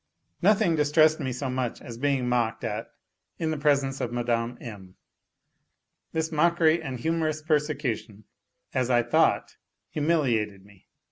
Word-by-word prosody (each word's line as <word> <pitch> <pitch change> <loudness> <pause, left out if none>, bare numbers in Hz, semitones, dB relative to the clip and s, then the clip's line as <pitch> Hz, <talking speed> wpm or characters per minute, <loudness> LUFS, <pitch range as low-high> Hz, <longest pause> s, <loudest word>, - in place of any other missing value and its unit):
Nothing 195 -2 +4
distressed 155 +1 +4
me 130 -4 -2
so 130 +3 -3
much 130 -2 -2
as 115 -1 -9
being 135 -2 +1
mocked 120 -2 0
at - - -3 0.5
in 160 -1 -1
the 155 - -2
presence 140 -2 +1
of 120 - -2
Mme. 120 0 -1
M. 95 -6 -10 1.2
This 160 0 -2
mockery 165 +1 +3
and 130 -2 -5
humorous 155 +1 -1
persecution, 135 -9 -1 0.5
as 130 -1 0
I 120 -1 +4
thought, 120 - +2 0.3
humiliated 120 - 0
me. 100 -2 -21
135 Hz, 135 wpm, -26 LUFS, 120-155 Hz, 1.2 s, Nothing